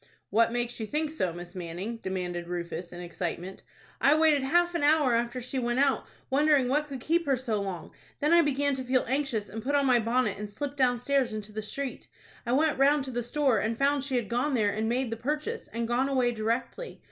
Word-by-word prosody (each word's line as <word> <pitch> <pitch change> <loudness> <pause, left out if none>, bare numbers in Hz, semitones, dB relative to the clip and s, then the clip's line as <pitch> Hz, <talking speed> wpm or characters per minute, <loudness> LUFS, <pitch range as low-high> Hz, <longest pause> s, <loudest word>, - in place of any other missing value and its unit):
"What 230 +2 +4
makes 240 0 -2
you 220 - -3
think 300 +4 -1
so, 185 - -1
Miss 175 +1 -9
Manning?" 185 +5 -5
demanded 180 -4 -4
Rufus, 175 0 -5
in 175 - -8
excitement. 175 +1 -5 0.4
"I 285 +3 +5
waited 310 -2 +4
half 345 +6 +2
an 340 - -1
hour 290 -3 +4
after 240 +2 0
she 260 +2 -2
went 240 0 -1
out, 275 -1 +2 0.2
wondering 285 -1 +4
what 295 +4 +1
could 275 -3 -6
keep 335 +5 0
her 270 -2 +3
so 230 -5 -2
long. 185 -5 -5 0.3
Then 300 +3 +2
I 340 - +7
began 285 -2 +1
to 260 -1 -3
feel 255 0 +1
anxious, 255 -5 -1
and 225 - -6
put 280 +5 -1
on 280 -1 +3
my 250 -2 +5
bonnet, 230 -3 0
and 210 0 -5
slipped 285 +7 -5
downstairs 255 -1 +2
into 215 0 -6
the 215 +1 -4
street. 265 +5 -5 0.4
I - - 0
went 295 +2 +2
round 285 +1 +4
to 265 - -5
the 245 0 -1
store, 250 -1 +1
and 220 +2 -1
found 280 +1 +2
she 275 -2 -2
had 240 -4 0
gone 250 +5 0
there 210 -4 +2
and 220 +1 -1
made 245 0 0
the 230 - -3
purchase, 300 - -3
and 230 +1 -3
gone 250 +3 +1
away 255 -3 +2
directly. 230 - -3
250 Hz, 225 wpm, -28 LUFS, 215-280 Hz, 0.4 s, I